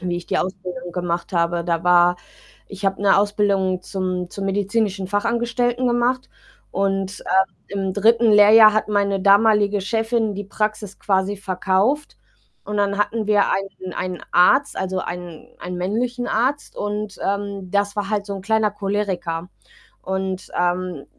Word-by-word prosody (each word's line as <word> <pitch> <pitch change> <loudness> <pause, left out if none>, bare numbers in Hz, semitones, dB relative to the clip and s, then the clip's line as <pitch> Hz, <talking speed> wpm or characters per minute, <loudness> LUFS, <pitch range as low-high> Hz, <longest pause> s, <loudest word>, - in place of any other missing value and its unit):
wie 175 -1 -2
ich 175 - -7
die - - 0
Ausbildung 180 -2 -5
gemacht 175 0 -3
habe. 170 0 0
Da 170 -1 -1
war 175 0 +5 0.5
ich 195 0 -5
habe 195 +1 -1
'ne 195 - +5
Ausbildung 200 -3 +1
zum 185 -2 -3
zum 195 -1 -5
medizinischen 200 0 -1
Fachangestellten 235 +3 0
gemacht 245 +1 0 0.4
und, 195 0 -1
äh, 190 0 +1 0.2
im 190 -1 -2
3. 230 +3 +4
Lehrjahr 215 +1 +8
hat 215 0 0
meine 200 -2 +1
damalige 205 0 +4
Chefin 225 0 0
die 205 0 -5
Praxis 210 0 -3
quasi 195 0 0
verkauft. 195 +8 0 0.5
Und 210 - -4
dann 200 0 +1
hatten 215 +1 -1
wir 205 -1 +4
einen 195 -2 -4
einen 185 -1 -4
Arzt, 265 +11 +4
also, 190 0 -2
einen 175 -3 -7
einen 180 0 -6
männlichen 240 +7 -2
Arzt 265 +6 -1
und, 205 0 -4
ähm, 200 -2 -3
das 200 0 0
war 205 -1 -2
halt 210 -2 0
so 200 - -4
'n 195 - -6
kleiner 220 +1 +1
Choleriker 190 -4 -3 0.5
und, 190 0 -3
ähm. 175 -3 -1
200 Hz, 150 wpm, -21 LUFS, 185-210 Hz, 0.5 s, Lehrjahr